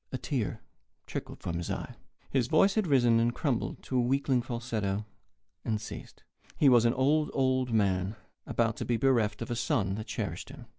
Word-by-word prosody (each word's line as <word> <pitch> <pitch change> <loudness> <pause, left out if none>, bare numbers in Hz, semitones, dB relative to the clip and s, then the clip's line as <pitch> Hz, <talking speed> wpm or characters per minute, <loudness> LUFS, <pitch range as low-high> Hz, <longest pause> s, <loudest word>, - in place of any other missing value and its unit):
A 130 - -2
tear 125 -6 -3 0.4
trickled - - -6
from 85 - -2
his 85 - -4
eye. - - -4 0.4
His 130 -4 +2
voice 175 +8 +4
had 215 -4 +1
risen, 120 -5 +4
and 120 +1 +1
crumbled 135 -7 -2
to 130 - -2
a - - +4
weakling 130 0 +2
falsetto, 115 -5 -3 0.6
and 110 -1 -1
ceased. 105 - -9 0.3
He 145 - +6
was 120 -2 +6
an 120 - +4
old, 150 +4 +2
old 130 -2 +1
man 100 -2 +1 0.3
about - - 0
to - - -3
be 120 - +1
bereft 115 -4 +2
of 115 - -7
a - - 0
son 115 -5 0
that 110 +2 -5
cherished - - -4
him. - - -11
120 Hz, 190 wpm, -30 LUFS, 110-135 Hz, 0.6 s, He